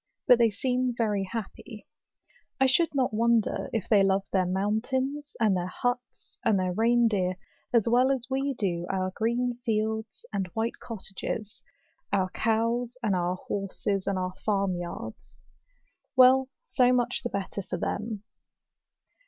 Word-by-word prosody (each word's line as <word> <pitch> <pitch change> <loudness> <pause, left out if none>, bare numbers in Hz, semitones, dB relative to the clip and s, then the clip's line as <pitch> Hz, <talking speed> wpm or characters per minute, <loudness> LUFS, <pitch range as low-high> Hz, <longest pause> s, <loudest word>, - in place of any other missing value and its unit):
But 245 - +6
they 230 -1 +5
seem 250 +3 -1
very 210 -4 +1
happy. 220 +1 -7 0.7
I 265 - +5
should 290 +4 +2
not 255 -4 +1
wonder 230 0 +1
if 220 -5 -2
they 210 -3 +5
love 195 0 +3
their 185 -2 +2
mountains, 260 +10 -1
and 215 -4 +3
their 180 0 -1
huts, 245 +6 -4
and 220 -3 +3
their 185 -1 0
rein 235 +3 +4
deer, 185 -4 0 0.3
as 235 -3 +3
well 245 +3 +4
as 265 -3 0
we 270 +1 -1
do 175 -6 -1
our 185 -1 -1
green 240 +2 0
fields, 220 -1 -2
and 195 -2 -1
white 225 +1 -1
cottages, 210 0 -6 0.5
our 185 -2 +1
cows, 230 +3 0
and 205 -4 +2
our 180 0 0
horses, 195 0 -3
and 200 - 0
our 185 0 -2
farm 195 -3 +1
yards. 170 -11 -7 0.8
Well, 260 +1 +6
so 250 -1 +3
much 245 -1 +1
the 245 - -3
better 200 -1 -3
for 180 - -4
them. 210 +3 -3
220 Hz, 150 wpm, -28 LUFS, 195-245 Hz, 0.8 s, But